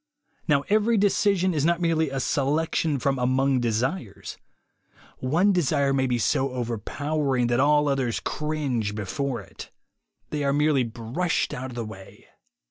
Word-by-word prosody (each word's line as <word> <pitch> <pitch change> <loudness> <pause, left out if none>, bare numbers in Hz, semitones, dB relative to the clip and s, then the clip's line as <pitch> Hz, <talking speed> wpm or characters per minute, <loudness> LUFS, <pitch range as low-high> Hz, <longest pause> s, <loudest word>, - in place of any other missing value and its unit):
Now 145 -3 +3
every 215 +3 +3
decision 195 -2 +2
is 150 -3 0
not 170 +2 +2
merely 165 -3 +1
a 135 0 -3
selection 150 +3 0
from 135 +1 0
among 130 +1 +2
desires. 120 - -2 0.8
One 165 +10 +2
desire 145 -5 +1
may 130 -1 +1
be 125 -1 0
so 135 +3 0
over 120 -3 -3
powering 145 +1 -1
that 120 - +2
all 150 +1 +4
others 135 -4 0
cringe 140 -9 -2
before 120 +6 -3
it; - - -11 0.6
they 150 -1 -2
are 140 0 +1
merely 150 -1 +3
brushed 120 +9 -2
out 130 +1 -5
of 125 - -10
the 120 -2 -3
way. 95 -3 -12
140 Hz, 150 wpm, -25 LUFS, 125-155 Hz, 0.8 s, all